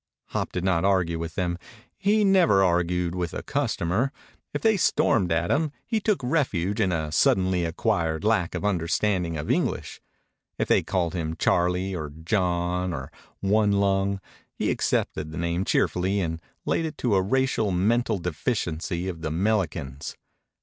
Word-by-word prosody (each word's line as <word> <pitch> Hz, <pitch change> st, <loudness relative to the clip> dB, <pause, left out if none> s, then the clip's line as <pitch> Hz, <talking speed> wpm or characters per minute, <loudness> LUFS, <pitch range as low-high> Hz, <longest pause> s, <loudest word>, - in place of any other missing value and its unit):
Hop -, -, -2 dB
did 90 Hz, -, -3 dB
not 90 Hz, -3 st, +2 dB
argue 90 Hz, -4 st, +2 dB
with 80 Hz, -1 st, -5 dB
them. 90 Hz, -2 st, -1 dB, 0.4 s
He 210 Hz, +2 st, +2 dB
never 175 Hz, -, +5 dB
argued 90 Hz, -1 st, +1 dB
with 90 Hz, -2 st, -3 dB
a -, -, -4 dB
customer. 100 Hz, +11 st, 0 dB, 0.4 s
If 145 Hz, -, -4 dB
they 220 Hz, -1 st, +5 dB
stormed 100 Hz, -, +2 dB
at 85 Hz, +1 st, +1 dB
him 150 Hz, +1 st, +1 dB
he 225 Hz, -2 st, 0 dB
took 210 Hz, -2 st, 0 dB
refuge 110 Hz, -, 0 dB
in 95 Hz, -3 st, +2 dB
a 80 Hz, -3 st, -2 dB
suddenly 90 Hz, +2 st, +2 dB
acquired 80 Hz, -2 st, 0 dB
lack 105 Hz, -5 st, +1 dB
of -, -, -3 dB
understanding 90 Hz, -2 st, 0 dB
of 75 Hz, -, -2 dB
English. -, -, -1 dB, 0.6 s
If -, -, 0 dB
they -, -, +4 dB
called 85 Hz, -3 st, -1 dB
him 80 Hz, -3 st, -2 dB
Charlie 90 Hz, +3 st, +1 dB
or 75 Hz, -3 st, -4 dB
John 90 Hz, +2 st, -1 dB
or 65 Hz, -4 st, -6 dB, 0.3 s
One 105 Hz, +1 st, +3 dB
Lung, 100 Hz, 0 st, +1 dB, 0.4 s
he -, -, 0 dB
accepted 80 Hz, -, -1 dB
the 80 Hz, -, -7 dB
name 85 Hz, +2 st, -1 dB
cheerfully 95 Hz, +3 st, +1 dB
and 80 Hz, -3 st, -2 dB, 0.2 s
laid 165 Hz, -, +1 dB
it 155 Hz, -, -5 dB
to 120 Hz, -4 st, 0 dB
a 95 Hz, -, +4 dB
racial 120 Hz, +1 st, +1 dB
mental 110 Hz, +5 st, +1 dB
deficiency 90 Hz, 0 st, -2 dB
of 85 Hz, -3 st, -5 dB
the 80 Hz, -, -2 dB
'melicans. 80 Hz, -7 st, -1 dB
90 Hz, 160 wpm, -25 LUFS, 85-105 Hz, 0.6 s, never